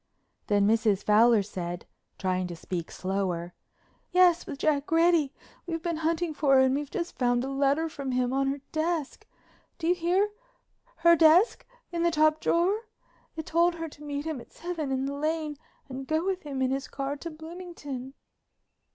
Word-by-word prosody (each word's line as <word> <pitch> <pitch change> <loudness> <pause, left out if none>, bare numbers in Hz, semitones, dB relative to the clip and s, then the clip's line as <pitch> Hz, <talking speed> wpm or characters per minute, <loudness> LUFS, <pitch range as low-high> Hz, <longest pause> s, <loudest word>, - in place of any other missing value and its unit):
Then 205 -1 +3
Mrs. 215 -2 +2
Fowler 220 0 +5
said, 175 -3 -5 0.3
trying 185 -1 -1
to 175 - -6
speak 170 0 -5
slower: 185 -2 -2 0.6
"Yes, 360 -2 +4
with 295 -5 -5
Jack 295 0 0
Reddy. 330 -3 +4 0.4
We've 330 -1 -3
been 340 -2 -1
hunting 325 +1 0
for 285 -2 +3
her 260 - +7
and 260 0 +3
we've 285 0 -2
just 350 -2 -5
found 245 -1 +2
a 270 - -3
letter 280 +4 +2
from 280 -4 -5
him 250 0 +1
in 270 0 +1
her 275 0 -2
desk. 315 -2 -2 0.5
Do 325 - -5
you 345 - +4
hear—her 415 +1 0
desk, 335 +7 +5 0.2
in 340 -1 -2
the 340 - +4
top 310 -1 +3
drawer? 395 +7 +1 0.5
It 315 -1 -5
told 340 +1 +2
her 330 -1 -4
to 295 0 -14
meet 290 0 -4
him 310 -6 -3
at - - -16
seven 335 -5 -4
in 265 0 0
the 280 - -3
Lane 305 0 -2 0.3
and 265 0 -7
go 315 +2 0
with 380 -1 -1
him 275 -3 -3
in 260 - +1
his 270 0 -2
car 275 +1 -3
to 335 - -6
Bloomington." 315 -5 -8
295 Hz, 175 wpm, -28 LUFS, 260-335 Hz, 0.6 s, her